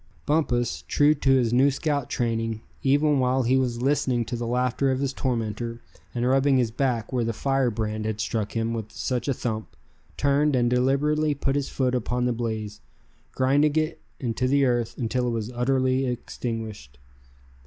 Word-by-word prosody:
Bumpus, 125 -6 0
true 145 +1 +4
to 140 -2 -1
his 125 -3 +3
new 130 +3 +5
scout 140 -1 -1
training, 115 -2 -1 0.2
even 145 +1 +3
while 130 +1 +2
he 125 +2 +3
was 125 -2 0
listening 130 -4 +1
to 120 - -4
the 120 0 -3
laughter 125 +2 +1
of 130 0 0
his 135 -1 -1
tormentor, 115 -2 -2 0.4
and 120 +1 0
rubbing 135 +1 +3
his 120 -3 +1
back 120 -1 -1
where 125 -2 +1
the 115 0 -1
fire 135 +2 +1
brand 110 -1 -3
had 110 -1 -2
struck 105 -1 -2
him 115 0 -1
with 110 -2 -5
such 125 -1 -2
a 140 - +2
thump; 110 -3 -4 0.4
turned, 145 +1 +2
and 120 -1 +2
deliberately 145 +4 +2
put 135 0 -1
his 145 -1 -1
foot 130 -2 0
upon 125 0 0
the 125 - +1
blaze, 110 -3 -4 0.5
grinding 145 +3 +2
it 155 +1 0 0.2
into 125 0 -1
the 140 +1 +3
earth 120 -2 0
until 125 +1 -1
it - - 0
was 115 0 -3
utterly 130 +1 +1
extinguished. 110 - -5
125 Hz, 175 wpm, -25 LUFS, 115-135 Hz, 0.5 s, new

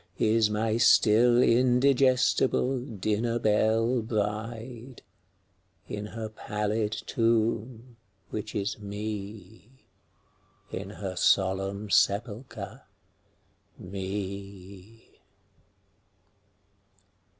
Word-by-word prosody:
Is 110 0 +3
n^y 110 +2 0
still 120 +2 +5
indigestible 130 +1 +3
dinner 115 0 -2
belle 115 +2 +2
bride, 115 +3 -4 0.8
In 105 0 -5
her 110 0 -6
pallid 105 0 -2
tomb, 115 +1 -1 0.3
which - - -5
is 105 +1 -2
Me, 105 +3 -8 0.9
In 95 +1 -5
her 95 -2 -6
solemn 95 +2 +1
sepulcher, 110 +4 0 1.0
Me. 100 +2 -7
110 Hz, 65 wpm, -28 LUFS, 100-115 Hz, 1.0 s, still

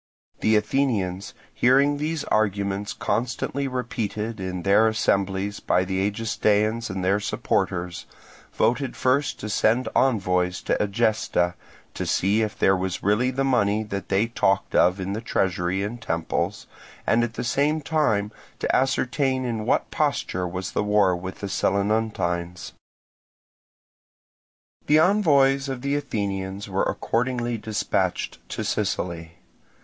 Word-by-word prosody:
The 110 - +3
Athenians, 105 -5 0 0.2
hearing 140 +4 +4
these 155 +1 -2
arguments 100 -1 0
constantly 125 +3 -2
repeated 115 -3 -3
in 90 -1 -4
their 100 +3 +5
assemblies 100 -2 0
by 90 - +1
the 95 0 -2
Egestaeans 110 +1 0
and 95 -1 -3
their 100 +2 +3
supporters, 90 -3 -2 0.4
voted 125 +1 0
first 135 +2 +1
to 105 - -4
send 110 +4 +2
envoys 90 -8 +2
to - - +1
Egesta, 105 -4 +1 0.4
to - - -4
see 100 +4 +2
if 110 -1 -2
there 95 - +4
was 95 -1 -3
really 105 +6 +2
the 135 +1 -1
money 110 -5 +2
that 100 -3 -5
they 100 +3 +2
talked 100 -4 0
of 90 +2 +4
in 95 +1 -3
the 110 - -3
treasury 95 -3 0
and 115 +3 -5
temples, 80 -6 -2 0.4
and 120 +1 +3
at 115 -1 -3
the - - -3
same 145 +6 +1
time 135 -10 0 0.3
to - - 0
ascertain 130 0 +1
in 115 -3 -3
what - - +1
posture 90 0 -1
was 90 +1 -4
the - - 0
war 105 -3 +3
with 95 +2 -7
the 100 - -3
Selinuntines. 95 -4 -1 2.2
The 150 - +5
envoys 145 -7 +4
of 130 -1 -5
the 140 +1 0
Athenians 100 -7 -3
were 95 0 -1
accordingly 120 0 -1
dispatched 105 -4 -1
to - - -3
Sicily. 85 -2 -2
105 Hz, 135 wpm, -24 LUFS, 95-125 Hz, 2.2 s, their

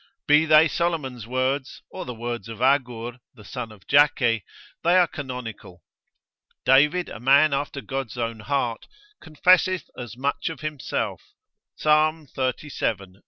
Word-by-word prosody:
Be 150 +2 +5
they 155 +1 +7
Solomon's 145 -9 -2
words, 130 +2 -2
or - - -6
the 125 - -5
words 120 0 -5
of 115 -1 -8
Agur, 125 -2 0 0.2
the 105 - -14
son 125 -3 -6
of 105 -3 -16
Jakeh, 125 -6 +3 0.4
they 175 +2 +4
are 180 - +6
canonical. 125 - -8 0.8
David, 150 +7 +4
a - - -8
man 140 +4 +5
after 140 0 -2
God's 135 -3 -5
own 115 -1 -3
heart, 120 0 -2 0.3
confesseth 180 +2 +2
as 120 -2 -8
much 140 +4 -1
of 160 - -8
himself, 155 -3 -3 0.6
Psal. 155 +1 +2
xxxvii. 115 -8 -3
135 Hz, 135 wpm, -24 LUFS, 120-150 Hz, 0.8 s, they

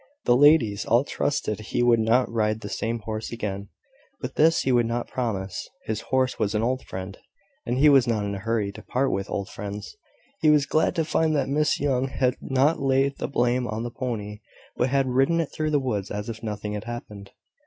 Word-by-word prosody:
The 120 - +5
ladies 130 -7 +5
all 120 +3 +3
trusted 145 -7 -2
he 110 +2 -1
would 120 -1 +4
not 115 +3 +3
ride 110 -1 0
the 105 - -6
same 115 +3 -2
horse 110 0 -5
again; 100 -4 -4 0.5
but - - -5
this 165 +2 +4
he 130 - 0
would 120 -2 +3
not 120 +1 -2
promise: 100 -7 -3 0.2
his 110 0 -2
horse 130 -1 +1
was 105 -1 0
an 105 - +1
old 130 +2 0
friend; 95 +1 -7 0.5
and 120 +1 0
he 145 +3 +5
was 135 -4 +6
not 110 -3 0
in 100 - -3
a 100 - -4
hurry 110 -1 -1
to - - -11
part 135 +2 0
with 95 +1 -2
old 100 -1 -3
friends. 105 0 -7 0.4
He 155 - +4
was 150 -2 +5
glad 155 +4 +1
to 165 -2 +1
find 155 0 +1
that 135 -2 0
Miss 150 +1 +1
Young 135 -2 +1
had 130 -1 0
not 135 +4 +2
laid 135 +1 +1
the - - -2
blame 125 -2 +1
on 110 0 -3
the 120 - -4
pony, 105 -5 -4 0.4
but 125 - +1
had 135 0 +2
ridden 135 +6 +2
it 165 - -2
through 155 0 -1
the 150 - +2
woods 105 -7 -2
as 105 +2 -4
if 115 -1 -6
nothing 105 -1 -4
had 105 0 -5
happened. 105 -4 -8
120 Hz, 215 wpm, -25 LUFS, 105-135 Hz, 0.5 s, was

